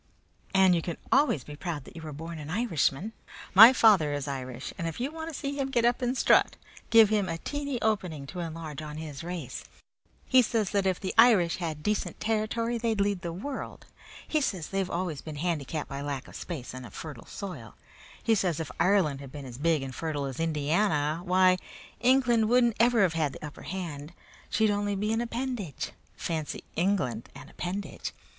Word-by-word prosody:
"And 190 -1 +6
you 170 - +2
can 170 0 -4
always 275 - +3
be 150 - -9
proud 155 -2 -4
that - - -14
you 165 - -8
are - - -5
born 165 +3 -7
an 150 0 -7
Irishman. 200 - 0 0.4
My 220 +6 +11
father 205 - +5
is 145 0 -3
Irish, 130 -2 -5
and 165 - -3
if 165 - -5
you 265 +4 -2
want 320 +1 -6
to 300 - -6
see 280 -1 -3
him 275 -1 -1
get 240 -3 +2
up 240 +2 +2
and 250 +1 0
strut - - +4 0.3
give 225 -2 +7
him 205 -4 +1
a 165 - -2
teeny 285 - -3
opening 180 -10 -1
to 180 +6 -7
enlarge 160 -3 -5
on 150 0 -7
his 155 -2 -7
race. 170 -7 -5 0.6
He 260 0 +6
says 225 -4 0
that 200 -2 +1
if 185 -2 +1
the 190 - -3
Irish 210 -8 +6
had 160 -4 -4
decent 210 -1 -1
territory 225 +2 0
they'd 225 -2 0
lead 200 -2 +1
the 170 -2 -4
world. 260 +11 -6 0.4
He 310 - +1
says 185 - -2
they've 195 -1 -1
always 170 -5 -2
been 155 -2 -7
handicapped 155 -2 -2
by 140 0 -5
lack 140 -2 -4
of - - -13
space 155 -8 -6
and 130 0 -7
of 115 - -11
fertile 145 -7 -8
soil. 155 - -7 0.5
He 225 - +3
says 180 -7 +1
if 155 -6 -4
Ireland 175 -8 +3
had 135 -2 -9
been 145 -1 -8
as 125 -1 -9
big 160 -2 +2
and 135 -1 -6
fertile 150 -2 -3
as 135 0 -5
Indiana, 155 0 +1
why, 185 0 +4 0.4
England 240 -2 +4
wouldn't 240 -2 +4
ever 235 -2 +5
have 180 -4 +2
had 155 -4 0
the - - -8
upper 150 - -9
hand. 170 -4 -6 0.4
She'd 220 -1 +3
only 205 0 0
be 210 +3 0
an 225 - +1
appendage. 235 - -3 0.3
Fancy 160 -3 -3
England 170 - 0
an - - -11
appendage! 190 +3 -5
180 Hz, 200 wpm, -28 LUFS, 150-220 Hz, 0.6 s, My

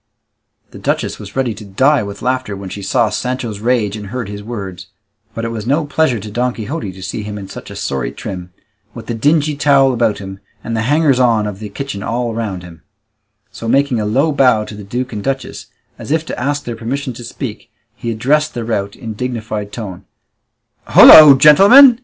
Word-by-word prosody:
The - - -11
duchess - - -2
was 100 -2 -10
ready 130 -4 0
to 105 +1 -11
die 130 +9 +2
with 100 -1 -7
laughter 130 -5 -2
when 95 -1 -8
she 100 - -7
saw 110 +3 +1
Sancho's 125 -4 -3
rage 110 -3 0
and 105 -2 -7
heard 120 0 -5
his 105 0 -7
words; 100 -5 -7 0.5
but 115 - -3
it - - -2
was 110 -1 -6
no 145 +4 +1
pleasure 145 -5 0
to 105 +1 -8
Don 125 +3 -1
Quixote 115 -2 -5
to 95 0 -12
see 105 - -4
him 105 0 -6
in 100 -2 -8
such - - -10
a - - -9
sorry 65 -3 -3
trim, 90 -2 -7 0.4
with 115 -2 -9
the 120 - -4
dingy 150 +5 +1
towel 140 -2 +3
about 115 -3 +1
him, 95 -1 -9 0.2
and 115 - -4
the 110 - 0
hangers 145 -3 +3
on 115 -4 +3
of 105 -2 -5
the 105 -1 -7
kitchen 100 -1 -6
all 120 +2 -2
round 105 -6 -4
him; 85 -2 -13 0.7
so 115 - -8
making 135 0 +2
a 105 - -2
low 135 +9 +1
bow 125 -6 +3
to - - -10
the 105 0 -9
duke 125 +5 -4
and 105 -1 -5
duchess, 135 -1 -4 0.3
as - - -9
if 160 +2 0
to - - -6
ask 145 +3 -2
their 120 -3 -5
permission 130 +4 -4
to 120 - -10
speak, 115 -2 -7 0.3
he 115 - -5
addressed 140 +8 0
the 120 -2 -4
rout 100 -3 -2
in 115 -4 -7
a - - -5
dignified 110 -3 -4
tone: 100 -6 -8 0.8
"Holloa, 150 -3 +10
gentlemen! 225 - +8
115 Hz, 210 wpm, -16 LUFS, 105-135 Hz, 0.8 s, Holloa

